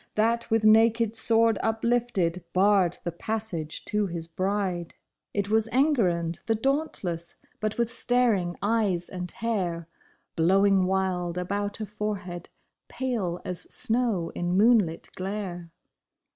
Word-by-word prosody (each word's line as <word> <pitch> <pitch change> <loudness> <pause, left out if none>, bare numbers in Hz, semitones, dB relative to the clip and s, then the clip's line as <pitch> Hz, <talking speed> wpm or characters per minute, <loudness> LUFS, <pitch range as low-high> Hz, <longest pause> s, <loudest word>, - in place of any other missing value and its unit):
That 230 +2 +1
with 225 -1 +2
naked 225 +1 +4
sword 225 -1 +3
uplifted 225 -6 0
barred 190 -2 +3
the 175 - -2
passage 175 -4 -4
to 210 -1 0
his 170 -2 -5
bride! 185 +4 -1
8 195 -3 0
THE 175 0 -4
DEFENCE 165 - -20
OF - - -50
THE 200 - -4
BRIDE. - - -10
It - - -9
was 220 0 +3 0.4
Enguerrand 170 -1 -2
the 225 - +2
dauntless, 215 - -1 0.2
but 215 0 -2
with 235 -1 0
staring 230 -8 +1
eyes 205 -5 +1
and 180 -1 -5
hair 185 -8 -2 0.5
Blowing 190 +3 +4
wild 185 -2 -1
about 200 +3 -2
a 215 - -3
forehead 200 -4 -5 0.4
pale 220 -10 -2
as 180 -1 -4
snow 225 -7 0
in 175 +1 -1
moonlit 205 -6 +3
glare. 185 -3 -5
200 Hz, 145 wpm, -27 LUFS, 175-225 Hz, 0.5 s, naked